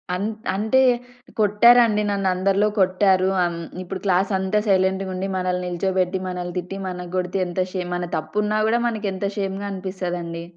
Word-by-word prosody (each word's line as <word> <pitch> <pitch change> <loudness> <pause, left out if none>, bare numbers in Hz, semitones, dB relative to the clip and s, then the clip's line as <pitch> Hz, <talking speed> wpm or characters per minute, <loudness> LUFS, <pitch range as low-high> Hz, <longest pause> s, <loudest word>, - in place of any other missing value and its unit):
అంట్ 210 +3 -3
అంటే 220 +6 +2 0.6
కొట్టారండి 215 +1 +5
నన్ను 195 -1 0
అందరిలో 195 +3 +2
కొట్టారు. 190 0 +3
అన్ 170 -1 -2 0.2
ఇప్పుడు 185 +1 -6
క్లాసంతా 190 +2 +1
సైలెంట్‌గుండి, 190 -1 +1
మనల్ని 180 -1 -1
నిల్చోబెట్టి, 185 +1 0
మనల్ని 180 -1 -4
తిట్టి, 180 +2 -4
మన 180 -1 -5
కొడితే 180 +1 -1
ఎంత 175 +1 -4
షేమ్ 180 -2 -3
మన 175 0 -3
తప్పున్నా 210 +6 -1
గూడా 235 +2 +2
మనకెంత 205 -4 -3
షేమ్‌గా 195 0 -3
అనిపిస్తాదండి! 180 -3 -4
190 Hz, 135 wpm, -22 LUFS, 180-200 Hz, 0.6 s, కొట్టారండి